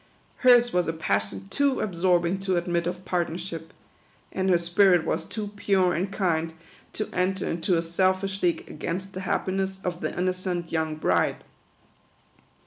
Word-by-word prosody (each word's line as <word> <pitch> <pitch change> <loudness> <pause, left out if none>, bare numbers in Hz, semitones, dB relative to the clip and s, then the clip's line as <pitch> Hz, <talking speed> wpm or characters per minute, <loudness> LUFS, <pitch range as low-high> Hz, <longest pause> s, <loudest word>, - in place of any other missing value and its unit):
Hers 245 -1 +5
was 180 -1 +2
a 165 - 0
passion 100 -9 -2
too 280 -2 +1
absorbing 180 -1 +1
to 190 -2 0
admit 170 0 0
of 180 +1 -5
partnership; 170 -1 -3 0.6
and 190 0 -1
her 180 - +5
spirit 175 0 +4
was - - -1
too 210 -2 -5
pure 190 -3 +2
and 190 +4 -1
kind 165 -5 0 0.4
to 215 - -3
enter 185 +1 0
into 170 +2 0
a 165 - 0
selfish 190 +3 0
league 175 -2 0
against 185 +5 -5
the 185 - -5
happiness 190 0 -1
of 175 -1 -3
the - - -1
innocent 180 -1 -2
young 160 -1 -1
bride. 155 - +1
180 Hz, 150 wpm, -26 LUFS, 170-190 Hz, 0.6 s, Hers